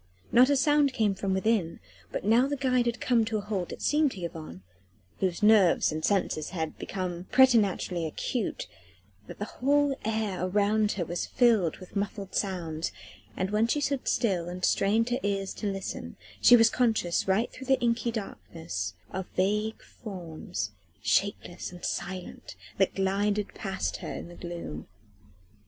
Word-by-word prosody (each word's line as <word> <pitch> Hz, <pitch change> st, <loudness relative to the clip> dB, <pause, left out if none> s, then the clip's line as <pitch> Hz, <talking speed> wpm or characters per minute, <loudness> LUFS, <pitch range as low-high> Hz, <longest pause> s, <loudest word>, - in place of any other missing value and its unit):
Not 250 Hz, +3 st, +6 dB
a 285 Hz, -, +4 dB
sound 290 Hz, 0 st, +3 dB
came 220 Hz, -5 st, +2 dB
from 195 Hz, 0 st, -3 dB
within, 190 Hz, -3 st, +1 dB, 0.3 s
but -, -, -4 dB
now 235 Hz, +5 st, +4 dB
that -, -, -6 dB
the 285 Hz, -, 0 dB
guide 250 Hz, -1 st, +3 dB
had 235 Hz, 0 st, -1 dB
come 240 Hz, -3 st, +3 dB
to 220 Hz, 0 st, -1 dB
a -, -, -2 dB
halt 200 Hz, -4 st, -3 dB
it -, -, -7 dB
seemed 295 Hz, -2 st, +3 dB
to 190 Hz, -, -9 dB
Yvonne 155 Hz, -, -7 dB, 0.6 s
whose 185 Hz, +2 st, -1 dB
nerves 210 Hz, -7 st, +5 dB
and 155 Hz, 0 st, -4 dB
senses 185 Hz, -6 st, 0 dB
had 160 Hz, -4 st, -3 dB
become 180 Hz, -2 st, -4 dB
preternaturally 205 Hz, -10 st, +3 dB
acute 220 Hz, -, -3 dB, 0.6 s
that -, -, -9 dB
the 205 Hz, -, -3 dB
whole 285 Hz, +4 st, +1 dB
air 215 Hz, -4 st, -1 dB
around 205 Hz, +3 st, +2 dB
her 175 Hz, -4 st, -2 dB
was 175 Hz, +1 st, -3 dB
filled 220 Hz, -10 st, +3 dB
with 185 Hz, +1 st, -13 dB
muffled 200 Hz, -1 st, -3 dB
sounds, 170 Hz, -5 st, -2 dB, 0.5 s
and 185 Hz, +2 st, -1 dB
when 215 Hz, +2 st, +2 dB
she 295 Hz, -, +1 dB
stood 280 Hz, -2 st, -1 dB
still 180 Hz, -7 st, +1 dB
and 180 Hz, +1 st, -2 dB
strained 220 Hz, +4 st, +2 dB
her 245 Hz, -, +1 dB
ears 195 Hz, -1 st, -1 dB
to 205 Hz, -2 st, -3 dB
listen 195 Hz, 0 st, -5 dB, 0.3 s
she 245 Hz, -, +9 dB
was 230 Hz, -1 st, +5 dB
conscious 220 Hz, -9 st, +1 dB
right 195 Hz, +5 st, +2 dB
through 265 Hz, -, -10 dB
the 265 Hz, -1 st, +4 dB
inky 235 Hz, 0 st, +1 dB
blackness 160 Hz, -, -5 dB, 0.2 s
of 190 Hz, 0 st, -4 dB
vague 210 Hz, +4 st, 0 dB
forms 165 Hz, -, -6 dB, 0.3 s
shapeless 195 Hz, -3 st, 0 dB
and 180 Hz, -1 st, -8 dB
silent 180 Hz, 0 st, -5 dB, 0.2 s
that 195 Hz, -, +2 dB
glided 200 Hz, +2 st, 0 dB
past 190 Hz, -1 st, -3 dB
her -, -, -6 dB
in -, -, -7 dB
the 175 Hz, -, -11 dB
gloom. 170 Hz, -, -7 dB
200 Hz, 165 wpm, -28 LUFS, 180-230 Hz, 0.6 s, she